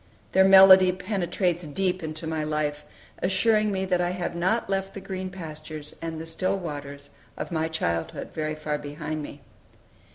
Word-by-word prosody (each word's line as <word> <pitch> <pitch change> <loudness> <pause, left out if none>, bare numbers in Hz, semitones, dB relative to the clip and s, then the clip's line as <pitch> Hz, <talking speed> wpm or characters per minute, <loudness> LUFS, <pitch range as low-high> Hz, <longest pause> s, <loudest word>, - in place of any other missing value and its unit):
Their 190 0 +5
melody 190 -1 +9
penetrates 180 -3 -1
deep 185 +4 -1
into 155 0 -5
my 160 -1 -2
life, 150 -1 -2 0.4
assuming 215 +3 +2
me 190 -1 -1
that 180 -1 +1
I 175 - +1
have 180 -1 -3
not 185 +7 0
left 195 0 -2
the - - -4
green 190 -1 -5
pastures 155 -4 -8
and 165 -1 -4
the 160 - -6
still 185 +4 -1
waters 145 -5 -7 0.3
of - - -5
my 160 -1 0
childhood 85 - -3
very 155 0 -2
far 150 -1 -3
behind 150 +1 -5
me. 145 -1 -9
170 Hz, 165 wpm, -26 LUFS, 155-190 Hz, 0.4 s, melody